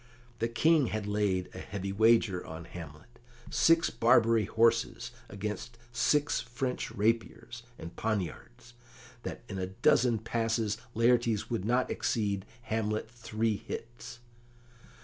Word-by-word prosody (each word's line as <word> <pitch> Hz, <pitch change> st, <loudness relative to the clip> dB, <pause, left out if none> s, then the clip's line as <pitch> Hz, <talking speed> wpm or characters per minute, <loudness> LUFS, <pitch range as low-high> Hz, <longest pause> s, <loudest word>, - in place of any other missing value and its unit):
The 115 Hz, -, +1 dB
King 150 Hz, +4 st, +3 dB
had 110 Hz, -1 st, -3 dB
laid 105 Hz, -3 st, 0 dB
a 95 Hz, -, -7 dB
heavy 100 Hz, 0 st, -5 dB
wager 110 Hz, -3 st, +3 dB
on 80 Hz, +1 st, -8 dB
Hamlet 85 Hz, +8 st, -11 dB, 0.3 s
six 165 Hz, 0 st, +4 dB
Barbary 115 Hz, -2 st, +4 dB
horses 115 Hz, +2 st, +1 dB, 0.2 s
against 105 Hz, +3 st, -5 dB
six 145 Hz, +5 st, +2 dB
French 125 Hz, +2 st, -3 dB
rapiers 115 Hz, +2 st, -1 dB, 0.2 s
and 85 Hz, +1 st, -9 dB
poniards, 105 Hz, -, -4 dB, 0.5 s
that -, -, -6 dB
in 100 Hz, -3 st, -5 dB
a 95 Hz, -, -2 dB
dozen 115 Hz, +5 st, +3 dB
passes 115 Hz, -1 st, -1 dB, 0.2 s
Laertes 115 Hz, -2 st, +2 dB
would 110 Hz, -5 st, -1 dB
not 125 Hz, +3 st, +1 dB
exceed 100 Hz, -3 st, -1 dB, 0.2 s
Hamlet 110 Hz, 0 st, -2 dB
three 115 Hz, -2 st, -1 dB
hits. 120 Hz, +3 st, -8 dB
115 Hz, 120 wpm, -30 LUFS, 100-120 Hz, 0.5 s, six